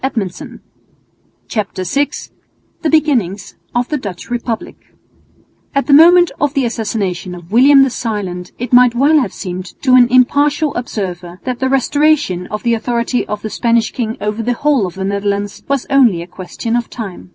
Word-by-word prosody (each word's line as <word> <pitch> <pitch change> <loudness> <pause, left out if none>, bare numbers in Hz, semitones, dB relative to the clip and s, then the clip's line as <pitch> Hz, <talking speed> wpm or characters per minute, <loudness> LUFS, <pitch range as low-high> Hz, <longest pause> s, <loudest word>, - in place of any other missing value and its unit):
CHAPTER 200 -4 -3
VI 275 +11 0 0.7
THE 320 - 0
BEGINNINGS 255 - 0 0.2
OF 240 +1 +1
THE 300 - -1
DUTCH 200 -2 -8
REPUBLIC 235 -2 -3 1.0
At 275 - +1
the 285 - +2
moment 345 +4 +7
of 290 0 0
the 275 -2 +1
assassination 205 -6 -3
of 175 0 -13
William 270 +4 +6
the 270 - 0
Silent 195 -7 -4
it 245 +1 -5
might 245 -1 +6
well 290 +5 +4
have 245 -8 -2
seemed 180 0 -7
to 260 - +2
an 250 -1 +7
impartial 285 +4 +2
observer 180 -7 -5
that 255 -2 -3
the 260 - 0
restoration 270 - +1
of 210 - -5
the 235 -1 +2
authority 235 +2 -1
of 210 0 -5
the 215 - -4
Spanish 235 +1 +1
king 225 -3 -3
over 210 +2 -2
the 245 +2 0
whole 270 -5 +1
of 175 - -9
the 190 - -4
Netherlands 200 0 -2
was 275 -2 -1
only 235 -11 +4
a 175 - -17
question 225 +5 -3
of 240 -1 -1
time. 190 - -8
235 Hz, 170 wpm, -16 LUFS, 200-270 Hz, 1.0 s, moment